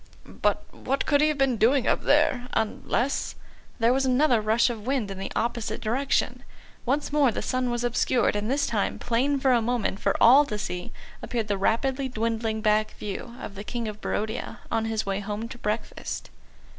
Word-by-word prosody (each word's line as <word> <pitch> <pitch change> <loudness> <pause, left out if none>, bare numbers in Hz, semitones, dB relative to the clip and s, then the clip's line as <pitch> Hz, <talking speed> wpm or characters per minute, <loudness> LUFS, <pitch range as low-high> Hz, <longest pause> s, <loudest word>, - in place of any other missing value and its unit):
"But - - -1
what 275 +2 -2
could 285 -1 +3
he 305 - +5
have 305 -1 0
been 270 -3 +2
doing 245 +4 +3
up - - +2
there? 270 -4 +2
Unless 240 +4 -1 0.2
" - - -28
There 230 +2 +4
was 270 +1 +1
another 255 -2 +3
rush 225 +3 +3
of 220 -1 -8
wind 255 -7 0
in 190 - -7
the 195 - -5
opposite 230 -2 -1
direction; 255 +6 0 0.5
once 285 +3 0
more 285 -4 +4
the - - -4
sun 255 -1 0
was 240 0 -2
obscured, 240 -1 +1
and 210 +2 -2
this 280 +2 +1
time, 210 -3 -1
plain 265 +4 0
for 265 0 +3
a 240 -2 +4
moment 230 -4 -1
for - - +1
all 265 +5 +8
to 210 - -4
see, 180 -3 -5 0.3
appeared 230 -3 -3
the 200 - +2
rapidly 260 +7 0
dwindling 225 -2 -1
back 215 0 +2
view 210 +4 -6
of - - -7
the 200 +1 -7
King 235 +1 -4
of 215 0 -7
Barodia 220 +3 -3
on 225 -1 +1
his 220 -1 -1
way 195 0 -1
home 210 +2 -4
to 240 - -9
breakfast. 215 +1 -4
235 Hz, 195 wpm, -26 LUFS, 215-260 Hz, 0.5 s, all